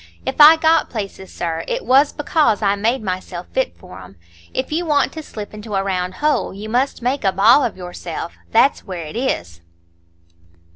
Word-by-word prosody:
If -, -, 0 dB
I 305 Hz, +2 st, +10 dB
got 320 Hz, 0 st, +2 dB
places, 195 Hz, -4 st, -6 dB
sir, 165 Hz, -1 st, -3 dB
it -, -, -3 dB
was 270 Hz, +4 st, +4 dB
because 295 Hz, -8 st, +1 dB
I 200 Hz, -1 st, +3 dB
made 225 Hz, +4 st, 0 dB
myself 185 Hz, -2 st, -5 dB
fit 260 Hz, -, -1 dB
for 180 Hz, -2 st, -12 dB
'em. -, -, -13 dB, 0.4 s
If 260 Hz, -, -3 dB
you 330 Hz, +3 st, 0 dB
want 295 Hz, -4 st, +1 dB
to 315 Hz, -, -6 dB
slip 215 Hz, -9 st, -9 dB
into 210 Hz, 0 st, -6 dB
a 195 Hz, -, +1 dB
round 185 Hz, -1 st, -2 dB
hole, 300 Hz, -9 st, 0 dB
you 210 Hz, +2 st, -7 dB
must 250 Hz, +2 st, -1 dB
make 265 Hz, +3 st, -1 dB
a 195 Hz, -, +3 dB
ball 210 Hz, +9 st, +5 dB
of 230 Hz, -, -2 dB
yourself; 175 Hz, -2 st, -6 dB, 0.2 s
that's 235 Hz, +5 st, +3 dB
where 180 Hz, -5 st, -6 dB
it 155 Hz, -, -9 dB
is." 85 Hz, -, -3 dB
215 Hz, 190 wpm, -19 LUFS, 185-270 Hz, 0.4 s, I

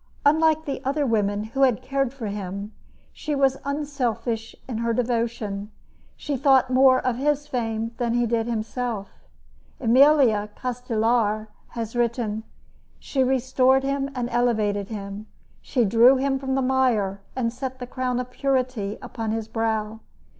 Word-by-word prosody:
Unlike 315 Hz, +1 st, +4 dB
the 275 Hz, -1 st, -4 dB
other 280 Hz, +2 st, 0 dB
women 205 Hz, -3 st, +1 dB
who 230 Hz, +5 st, -4 dB
had 255 Hz, -5 st, +3 dB
cared 270 Hz, -1 st, 0 dB
for 265 Hz, -4 st, -7 dB
him, 200 Hz, 0 st, -5 dB, 0.4 s
she 300 Hz, -1 st, -3 dB
was 270 Hz, -1 st, +2 dB
unselfish 260 Hz, -6 st, -2 dB
in 235 Hz, -4 st, -4 dB
her 230 Hz, 0 st, 0 dB
devotion. 230 Hz, -4 st, -2 dB, 0.5 s
She 290 Hz, -, -3 dB
thought 265 Hz, -1 st, +4 dB
more 260 Hz, 0 st, +6 dB
of 255 Hz, -2 st, -1 dB
his 295 Hz, +2 st, 0 dB
fame 230 Hz, -5 st, -2 dB
than 235 Hz, -2 st, 0 dB
did 225 Hz, -1 st, 0 dB
he -, -, -3 dB
himself. 225 Hz, -1 st, -3 dB, 0.7 s
Emilio 250 Hz, -4 st, +4 dB
Castelar 230 Hz, -3 st, 0 dB, 0.3 s
has 230 Hz, 0 st, -4 dB
written: 235 Hz, -2 st, 0 dB, 0.6 s
She 265 Hz, -2 st, -1 dB
restored 260 Hz, +1 st, +3 dB
him 275 Hz, 0 st, -1 dB
and 245 Hz, -1 st, -1 dB
elevated 215 Hz, -5 st, +1 dB
him. 205 Hz, 0 st, -6 dB, 0.3 s
She 245 Hz, -4 st, +1 dB
drew 235 Hz, +6 st, +6 dB
him 270 Hz, 0 st, 0 dB
from 265 Hz, 0 st, -2 dB
the 270 Hz, -, +1 dB
mire 240 Hz, -7 st, +1 dB
and 235 Hz, -3 st, -1 dB
set 260 Hz, +1 st, -5 dB
the 250 Hz, -, -6 dB
crown 250 Hz, 0 st, -2 dB
of 250 Hz, 0 st, -5 dB
purity 255 Hz, -7 st, -1 dB
upon 225 Hz, -2 st, -4 dB
his 220 Hz, 0 st, -2 dB
brow. 220 Hz, -1 st, -2 dB
245 Hz, 145 wpm, -24 LUFS, 220-265 Hz, 0.7 s, more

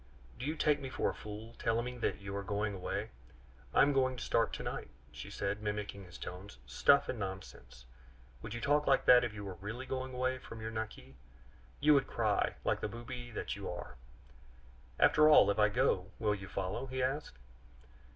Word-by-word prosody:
Do 130 Hz, -, -3 dB
you 155 Hz, -, -1 dB
take 150 Hz, -1 st, +2 dB
me 135 Hz, -2 st, -5 dB
for -, -, 0 dB
a -, -, -9 dB
fool, 110 Hz, +2 st, -8 dB
telling 115 Hz, +1 st, +1 dB
me 125 Hz, 0 st, -5 dB
that -, -, 0 dB
you 100 Hz, 0 st, -6 dB
are 100 Hz, -, -2 dB
going 105 Hz, +1 st, -1 dB
away? 95 Hz, -2 st, -3 dB, 0.6 s
'I -, -, +5 dB
am 145 Hz, +1 st, +3 dB
going 130 Hz, -1 st, +2 dB
to 120 Hz, -, -6 dB
start 115 Hz, -2 st, +2 dB
to -, -, -4 dB
night!'" -, -, -4 dB, 0.2 s
she -, -, -8 dB
said, 100 Hz, +1 st, -2 dB
mimicking 105 Hz, -2 st, -4 dB
his 90 Hz, -1 st, -11 dB
tones. 90 Hz, -5 st, -8 dB
"Stuff 140 Hz, -, +4 dB
and 125 Hz, -, -3 dB
nonsense! 95 Hz, -, -7 dB, 0.6 s
Would 110 Hz, -, -6 dB
you 120 Hz, -, -5 dB
talk 150 Hz, +3 st, +2 dB
like 135 Hz, -, +4 dB
that 125 Hz, -1 st, +8 dB
if 120 Hz, -, -1 dB
you 105 Hz, -1 st, -7 dB
were 95 Hz, -3 st, -7 dB
really 115 Hz, +6 st, -5 dB
going 130 Hz, -1 st, -4 dB
away 130 Hz, +1 st, 0 dB
from 115 Hz, -, -10 dB
your 110 Hz, 0 st, -4 dB
Naqui? 105 Hz, -, -6 dB, 0.6 s
You 150 Hz, +1 st, +6 dB
would 140 Hz, -2 st, +3 dB
cry, -, -, +1 dB
like -, -, +1 dB
the -, -, -1 dB
booby 120 Hz, +1 st, -7 dB
that 115 Hz, -, -4 dB
you 100 Hz, -1 st, -6 dB
are!" 85 Hz, -, -7 dB, 1.0 s
"After 155 Hz, 0 st, +6 dB
all, 150 Hz, -8 st, +7 dB
if 100 Hz, -, -2 dB
I 105 Hz, 0 st, +5 dB
go, 100 Hz, -5 st, +1 dB
will 105 Hz, -2 st, +1 dB
you 100 Hz, -1 st, -6 dB
follow?" 95 Hz, +7 st, -3 dB
he 130 Hz, 0 st, -2 dB
asked. 135 Hz, -, -2 dB
110 Hz, 205 wpm, -34 LUFS, 100-130 Hz, 1.0 s, that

